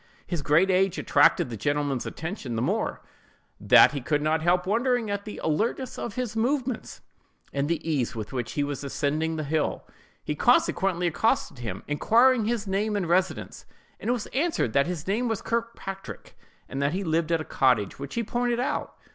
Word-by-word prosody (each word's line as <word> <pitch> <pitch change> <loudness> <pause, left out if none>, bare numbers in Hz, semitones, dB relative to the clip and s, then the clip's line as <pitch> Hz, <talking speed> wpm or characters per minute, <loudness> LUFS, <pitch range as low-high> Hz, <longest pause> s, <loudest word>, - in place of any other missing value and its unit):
His 175 -4 -3
great 165 +7 +3
age 190 0 +2
attracted 145 -3 +3
the - - -3
gentleman's 145 +2 -1
attention 160 - -5
the 115 - -1
more, - - -1 0.6
that - - +7
he 145 -2 -4
could 150 +3 0
not 155 +1 +1
help 175 +2 +2
wondering 235 +2 +1
at 200 0 -3
the 215 - -7
alertness 230 - -1
of 230 - -5
his 250 -3 -3
movements, 250 +1 -1 0.5
and 140 +1 -1
the 165 -1 -2
ease 140 -8 0
with 110 +2 -6
which 125 -3 -3
he 145 - 0
was 145 0 -4
ascending 150 +3 -1
the 155 - -3
hill. 150 +1 -1 0.4
He - - -2
consequently 180 -2 +2
accosted 175 - 0
him, 120 -2 -5
inquiring 230 - +4
his 225 -1 -1
name 205 +2 -1
and 195 -4 -1
residence; 185 +2 -1 0.3
and 235 - -1
was 240 -3 -1
answered 290 - 0
that 140 0 +3
his 175 -3 -4
name 220 +6 0
was 225 -3 -2
Kirkpatrick, 230 -4 -5 0.3
and 135 - -4
that 140 +2 +1
he 195 +2 -2
lived 165 -1 0
at 165 - +3
a 155 - -5
cottage, 125 -7 +1
which 140 0 -6
he 235 - 0
pointed 240 +2 -1
out. 250 - -2
175 Hz, 185 wpm, -26 LUFS, 145-225 Hz, 0.6 s, that